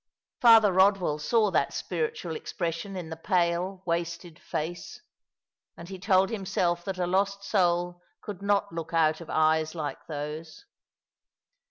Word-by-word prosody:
Father 225 Hz, -4 st, +7 dB
Kodwell 190 Hz, -5 st, +3 dB
saw 210 Hz, +6 st, +2 dB
that 140 Hz, -, 0 dB
spiritual 165 Hz, -1 st, -3 dB
expression 170 Hz, +4 st, -4 dB
in 170 Hz, -3 st, -6 dB
the -, -, -4 dB
pale, 180 Hz, +2 st, 0 dB
wasted 170 Hz, -1 st, -3 dB
fac«, 170 Hz, +3 st, -4 dB, 1.0 s
and 170 Hz, +1 st, -10 dB
he 190 Hz, -1 st, -7 dB
told 190 Hz, +1 st, +3 dB
himself 185 Hz, -4 st, -1 dB
that 195 Hz, -1 st, -3 dB
a 180 Hz, -, 0 dB
lost 195 Hz, +2 st, 0 dB
soul 175 Hz, -3 st, +1 dB, 0.2 s
could 200 Hz, -3 st, -8 dB
not 200 Hz, -1 st, +1 dB
look 165 Hz, 0 st, -5 dB
out 160 Hz, 0 st, +2 dB
of 165 Hz, -, -10 dB
eyes 155 Hz, +1 st, +2 dB
like 155 Hz, -3 st, -5 dB
those. 155 Hz, -, -6 dB
175 Hz, 140 wpm, -27 LUFS, 165-195 Hz, 1.0 s, Father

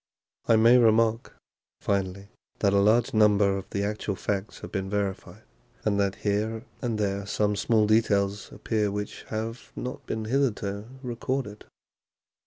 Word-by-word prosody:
I 115 Hz, -, +6 dB
may 115 Hz, +3 st, +6 dB
remark, 115 Hz, 0 st, +3 dB, 0.4 s
finally, 100 Hz, 0 st, -2 dB, 0.3 s
that 100 Hz, -1 st, +2 dB
a 100 Hz, -, +4 dB
large 110 Hz, +4 st, +3 dB
number 105 Hz, -2 st, +4 dB
of 95 Hz, -, -6 dB
the 100 Hz, -, -2 dB
actual 105 Hz, -1 st, -2 dB
facts 100 Hz, +2 st, -3 dB
have -, -, -8 dB
been 95 Hz, -1 st, -3 dB
verified, 100 Hz, -1 st, -3 dB, 0.4 s
and 100 Hz, -1 st, +2 dB
that 100 Hz, -1 st, +1 dB
here 110 Hz, +2 st, 0 dB, 0.2 s
and 115 Hz, -3 st, -1 dB
there 100 Hz, -1 st, -1 dB
some 105 Hz, 0 st, +1 dB
small 110 Hz, +1 st, +2 dB
details 105 Hz, -2 st, +1 dB
appear 105 Hz, 0 st, -1 dB
which 105 Hz, 0 st, -5 dB
have 115 Hz, +2 st, -5 dB
not 125 Hz, +1 st, -5 dB
been 110 Hz, -1 st, -3 dB
hitherto 110 Hz, -5 st, -1 dB, 0.2 s
recorded. 120 Hz, -3 st, -3 dB
105 Hz, 145 wpm, -27 LUFS, 100-115 Hz, 0.4 s, I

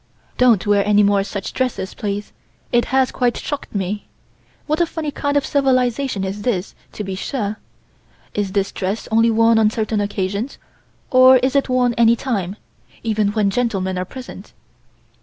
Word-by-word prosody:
Don't 240 Hz, -6 st, +4 dB
wear 205 Hz, -1 st, +3 dB
any 210 Hz, 0 st, +4 dB
more 200 Hz, -1 st, +3 dB
such 200 Hz, -1 st, -5 dB
dresses, 250 Hz, -7 st, -2 dB
please. 205 Hz, 0 st, -4 dB, 0.4 s
It 240 Hz, -1 st, +3 dB
has 265 Hz, -1 st, +2 dB
quite 245 Hz, -2 st, 0 dB
shocked 290 Hz, -6 st, -5 dB
me. 200 Hz, +1 st, -3 dB, 0.6 s
What 310 Hz, +3 st, 0 dB
a 340 Hz, -, +3 dB
funny 315 Hz, -2 st, -4 dB
kind 285 Hz, 0 st, -1 dB
of 285 Hz, -, +1 dB
civilization 255 Hz, -5 st, +1 dB
this 195 Hz, +2 st, -4 dB
is 205 Hz, -4 st, -2 dB, 0.2 s
to 210 Hz, -, -5 dB
be 195 Hz, -1 st, -4 dB
sure. 210 Hz, +1 st, -3 dB, 0.7 s
Is 200 Hz, -2 st, -2 dB
this 200 Hz, -1 st, 0 dB
dress 195 Hz, +3 st, -3 dB
only 225 Hz, +1 st, +4 dB
worn 225 Hz, 0 st, +4 dB
on 215 Hz, -1 st, +4 dB
certain 215 Hz, -1 st, -1 dB
occasions, 200 Hz, +4 st, -3 dB, 0.5 s
or 255 Hz, 0 st, +8 dB
is 260 Hz, +2 st, 0 dB
it 275 Hz, -1 st, +2 dB
worn 250 Hz, -1 st, +2 dB
any 230 Hz, 0 st, +6 dB
time, 205 Hz, -7 st, -3 dB, 0.5 s
even 215 Hz, -2 st, +1 dB
when 210 Hz, -2 st, +1 dB
gentlemen 195 Hz, -5 st, -1 dB
are 180 Hz, -, -2 dB
present?" 260 Hz, +6 st, -10 dB
220 Hz, 165 wpm, -20 LUFS, 200-255 Hz, 0.7 s, or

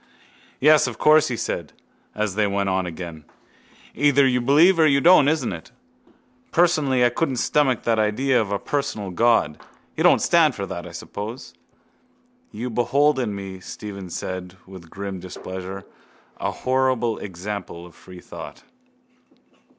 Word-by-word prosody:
—Yes, 150 Hz, 0 st, +5 dB
of 120 Hz, -3 st, -6 dB
course, 155 Hz, 0 st, +5 dB
he 120 Hz, -, -3 dB
said, -, -, -4 dB, 0.4 s
as 105 Hz, -2 st, -1 dB
they 105 Hz, +1 st, +1 dB
went 100 Hz, 0 st, -1 dB
on 95 Hz, -1 st, 0 dB
again. 85 Hz, -2 st, -8 dB, 0.7 s
Either 140 Hz, -1 st, +3 dB
you 125 Hz, -1 st, +2 dB
believe 160 Hz, +8 st, +4 dB
or 160 Hz, -, +6 dB
you 140 Hz, -1 st, +3 dB
don't, 160 Hz, -2 st, +6 dB
isn't 145 Hz, -8 st, 0 dB
it? 80 Hz, -, -10 dB, 0.8 s
Personally 150 Hz, -7 st, +3 dB
I -, -, +4 dB
couldn't 135 Hz, +2 st, -1 dB
stomach 130 Hz, 0 st, +1 dB
that 115 Hz, -1 st, +1 dB
idea 120 Hz, +4 st, +2 dB
of 105 Hz, -2 st, -4 dB
a 100 Hz, -, +1 dB
personal 140 Hz, -7 st, -3 dB
God. 115 Hz, -7 st, +2 dB, 0.4 s
You -, -, -1 dB
don't -, -, +6 dB
stand 165 Hz, -5 st, +3 dB
for 100 Hz, -, -4 dB
that, 90 Hz, -2 st, -7 dB
I -, -, -10 dB
suppose? 105 Hz, +8 st, -8 dB, 1.0 s
—You 120 Hz, +3 st, -5 dB
behold 135 Hz, +5 st, +2 dB
in 110 Hz, -5 st, -2 dB
me, 95 Hz, -1 st, -7 dB
Stephen 100 Hz, 0 st, -8 dB
said 90 Hz, +1 st, -6 dB
with 95 Hz, -3 st, -13 dB
grim 100 Hz, 0 st, -6 dB
displeasure, 95 Hz, +2 st, -8 dB, 0.5 s
a -, -, -1 dB
horrible 130 Hz, -3 st, 0 dB
example 95 Hz, -2 st, -7 dB
of 90 Hz, -, -15 dB
free 90 Hz, -1 st, -14 dB
thought. -, -, -10 dB
110 Hz, 150 wpm, -22 LUFS, 95-135 Hz, 1.0 s, or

